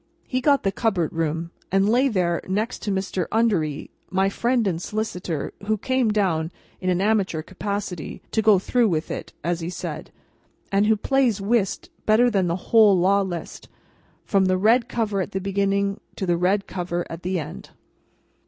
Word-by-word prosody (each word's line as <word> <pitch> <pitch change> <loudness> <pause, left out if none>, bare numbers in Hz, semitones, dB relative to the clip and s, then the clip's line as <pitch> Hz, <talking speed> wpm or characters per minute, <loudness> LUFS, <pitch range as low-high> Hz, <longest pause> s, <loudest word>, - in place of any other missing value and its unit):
He 255 0 -1
got 280 +1 +3
the 195 - +1
Cupboard 195 -6 0
Room, 165 +1 -2 0.2
and 195 +1 +3
lay 250 +5 +4
there 180 -7 0
next 210 +6 -2
to 205 - -2
Mr. 190 -2 -2
Undery, 180 -10 0 0.2
my 190 +2 +2
friend 235 +3 +1
and 175 -4 -1
solicitor: 180 -8 -3
who 215 0 +2
came 260 +1 +1
down, 180 -6 +1 0.3
in 185 - -1
an 180 0 +1
amateur 195 -6 +1
capacity, 190 -2 -5
"to 220 - +2
go 215 -2 +6
through 230 +4 +2
with 160 -2 -1
it," - - -5
as 170 +1 0
he 165 0 -4
said, 180 - -6 0.6
and 200 +1 +3
who 220 - +5
plays 250 -1 +1
whist 200 -1 0 0.2
better 235 +3 +5
than 195 -4 +1
the 170 - 0 0.2
whole 215 -4 +7
Law 195 +3 +4
List, 175 -4 -6 0.6
from 195 -2 +2
the 185 0 +2
red 230 +5 +3
cover 210 -4 -1
at - - -5
the 190 - 0
beginning 200 +1 0 0.2
to 190 - -3
the 175 -1 +2
red 190 +4 +1
cover 175 -1 -3
at 165 +1 -8
the 185 0 -1
end. 150 - -8
195 Hz, 180 wpm, -23 LUFS, 180-215 Hz, 0.6 s, whole